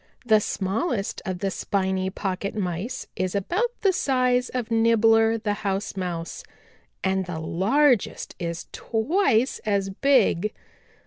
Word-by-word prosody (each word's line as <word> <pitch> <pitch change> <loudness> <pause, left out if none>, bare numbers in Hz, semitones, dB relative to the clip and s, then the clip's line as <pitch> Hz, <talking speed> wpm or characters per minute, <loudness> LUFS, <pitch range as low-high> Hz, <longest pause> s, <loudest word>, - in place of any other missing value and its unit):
The 220 -2 +5
smallest 205 - -2
of 185 -2 -3
the 195 -1 0
Spiny 190 -1 -1
Pocket 190 +1 -3
Mice 200 +5 -3
is 185 +1 -2
about 360 - 0
the 390 -2 +3
size 255 -4 +1
of 245 -2 -4
Nibbler 225 0 +4
the 215 -2 -1
House 195 0 -2
Mouse 175 -3 -4 0.6
and 190 -1 0
the 175 -2 -4
largest 220 - +1
is 170 -1 -4
twice 250 - +1
as 200 -2 0
big. 215 -5 +2
210 Hz, 125 wpm, -25 LUFS, 190-245 Hz, 0.6 s, The